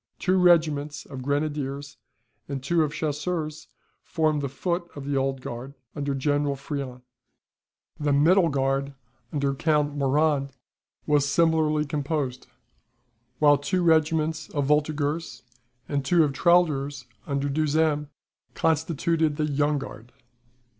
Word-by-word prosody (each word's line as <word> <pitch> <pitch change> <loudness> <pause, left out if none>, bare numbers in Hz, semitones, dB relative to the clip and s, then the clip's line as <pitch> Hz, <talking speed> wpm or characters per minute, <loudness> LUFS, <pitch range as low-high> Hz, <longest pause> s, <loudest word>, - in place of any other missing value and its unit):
Two 185 0 +1
regiments 155 -5 +2
of 135 -2 -8
grenadiers 145 0 -2 0.5
and 135 -2 -4
two 165 +4 +2
of 150 -2 +1
chasseurs, 155 +1 -3 0.4
formed 155 -2 0
the 140 - -2
foot 170 +5 -3
of 140 -1 -7
the 140 0 -1
Old 135 -1 0
Guard 125 +3 -7 0.2
under 140 -2 -2
General 145 +1 0
Friant. 135 -3 -6 1.0
The 145 -1 0
Middle 165 +5 +4
Guard, 135 0 -1 0.4
under 140 -2 0
Count 150 0 +1
Morand, 140 0 +1 0.5
was 145 -2 +2
similarly 155 -1 +2
composed; 145 -3 -3 0.9
while 145 -2 +5
two 175 +6 0
regiments 160 -1 +2
of 145 -2 -1
voltigeurs, 150 +2 0 0.4
and 140 -2 -1
two 165 +5 +4
of 145 -2 0
tirailleurs, 145 -4 +2 0.2
under 140 -1 -1
Duhesme, 150 +1 +1 0.5
constituted 160 0 +1
the 155 0 0
Young 145 0 +1
Guard. 120 -3 -9
145 Hz, 120 wpm, -25 LUFS, 140-155 Hz, 1.0 s, while